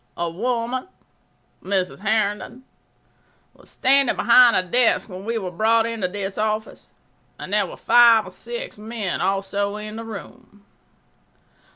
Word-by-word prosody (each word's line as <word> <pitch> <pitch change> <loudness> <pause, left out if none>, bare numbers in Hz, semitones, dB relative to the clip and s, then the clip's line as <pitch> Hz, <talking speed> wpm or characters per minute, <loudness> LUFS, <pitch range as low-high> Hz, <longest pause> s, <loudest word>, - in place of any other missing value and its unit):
A 170 - -1
woman 240 - -3 0.8
[Mrs. 190 -2 -2
Herndon] 215 +4 -2 0.9
was - - -19
standing 275 0 +2
behind 240 0 +6
a 185 - +2
desk 240 +6 +2
when 190 -1 -9
we 230 +1 -2
were 190 -4 -4
brought 225 +5 +2
into 230 -5 -2
this 195 +1 -5
office, 215 0 -3 0.5
and - - -8
there - - +2
were - - -10
five 235 -2 +5
or - - -10
six 485 - -8
men 215 -3 -4
also 195 +1 -1
in 215 +1 -7
the 230 - -6
room. 205 -1 -11
215 Hz, 140 wpm, -22 LUFS, 195-235 Hz, 0.9 s, behind